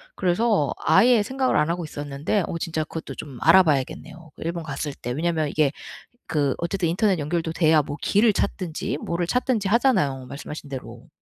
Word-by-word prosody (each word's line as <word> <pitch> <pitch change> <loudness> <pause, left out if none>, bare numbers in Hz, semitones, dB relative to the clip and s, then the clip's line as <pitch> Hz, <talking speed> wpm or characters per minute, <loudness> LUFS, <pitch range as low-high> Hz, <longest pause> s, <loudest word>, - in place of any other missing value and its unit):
그래서 185 - +1
아예 230 +8 +5
생각을 260 +3 0
안 150 +2 +2
하고 175 0 -2
있었는데 145 +6 -2
어 165 - -3
진짜 160 -1 -2
그것도 160 +1 -7
좀 135 -4 -8
알아봐야겠네요 160 -1 +2
그 - - -15
일본 170 0 -3
갔을 145 -1 -4
때. 120 - -6
왜냐하면 160 +1 0
이게 150 -2 +2 0.6
그 145 -4 0
어쨌든 170 0 -1
인터넷 190 0 +1
연결도 165 +2 -2
돼야 160 -2 +4
뭐 145 +2 -6
길을 210 +1 +3
찾든지 165 -6 -2
뭐를 170 0 -2
찾든지 245 -2 0
하잖아요 190 - +2
말씀하신 145 +1 -8
대로. 130 -2 -8
165 Hz, 395 characters per minute, -24 LUFS, 145-190 Hz, 0.6 s, 아예